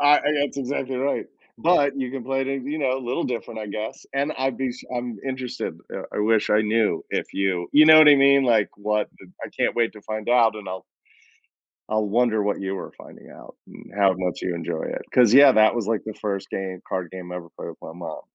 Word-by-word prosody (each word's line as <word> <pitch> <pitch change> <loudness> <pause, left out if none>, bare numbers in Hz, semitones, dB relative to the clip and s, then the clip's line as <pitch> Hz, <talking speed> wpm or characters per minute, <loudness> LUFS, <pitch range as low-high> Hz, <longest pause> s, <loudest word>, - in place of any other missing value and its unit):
I 145 +1 +6
I - - -3 0.2
That's 145 -1 -2
exactly 135 -1 -3
right, 140 +2 -1 0.3
but 155 -4 +3
you 130 -2 -3
can 130 -3 -6
play 135 0 -1
it, - - -4 0.2
you 150 +3 -3
know, 130 -2 0
a - - -5
little 120 +2 -2
different, 115 -2 -5
I 105 - -6
guess. 105 +2 -6
And 140 +3 0
I'd 135 0 -1
be 130 -2 -2
sh 125 - -13
I'm 120 -3 -4
interested, 130 -1 -4 0.2
eh, - - -5
I - - -2
wish 110 0 +2
I 105 0 +3
knew 110 +1 0
if - - -3
you 95 -3 -1
you 150 +1 +7
know 155 0 +9
what 155 -1 +8
I 145 - +9
mean? 140 0 +5
Like, 115 -4 +3
what 105 +1 -1 0.4
I - - -7
can't - - -1
wait 115 -1 +1
to 105 - -12
find 110 +1 -5
out, 115 -3 +4
and 105 - -9
I'll 95 0 -6 1.1
I'll 110 0 0
wonder 110 0 +1
what 105 0 -1
you 95 0 -3
were - - -7
finding - - -14
out - - -14
and - - -14
how 100 -2 +4
much 90 -1 -3
you 90 - -2
enjoy 85 -1 -4
it - - -4
'cause, 120 -3 +5
yeah, 140 0 +8
that 110 -1 +5
was 115 -4 -2
like 115 -2 -1
the 110 - -6
first 100 -2 -4
game 95 -1 -5
card 90 -3 -3
game 90 -1 -8
I - - -5
ever 85 -1 -10
played - - -7
with - - -11
my 80 - -9
mom. 85 -2 -7
115 Hz, 240 wpm, -23 LUFS, 100-135 Hz, 1.1 s, know